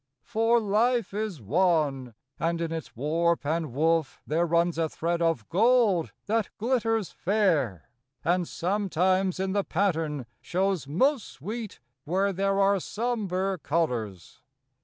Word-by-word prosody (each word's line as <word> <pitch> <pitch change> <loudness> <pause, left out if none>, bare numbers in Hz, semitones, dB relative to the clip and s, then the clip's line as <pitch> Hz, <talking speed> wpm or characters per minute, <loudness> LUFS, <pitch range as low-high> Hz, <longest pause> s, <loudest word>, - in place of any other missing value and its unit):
For 225 - +2
life 225 +1 +1
is 210 -6 -3
one, 145 - +1 0.2
and 165 0 0
in 165 -1 -2
its 165 -1 -6
warp 165 +6 0
and 160 -1 -1
woof 160 +2 +1
There 165 +3 +1
runs 170 0 +1
a 160 -1 +1
thread 170 +2 -2
of 165 -10 0
gold 215 -4 +3
that 220 -1 0
glitters 225 -3 0
fair, 170 - 0 0.4
And 175 0 +1
sometimes 185 0 0
in 190 0 -1
the 200 0 +1
pattern 160 -8 -1 0.2
shows 185 -4 -1
most 255 - +1
sweet 210 - -7 0.2
Where 195 +5 +1
there 195 +1 0
are 200 0 +4
sombre 195 -4 -2
colors. 120 - -2
180 Hz, 130 wpm, -27 LUFS, 160-205 Hz, 0.4 s, are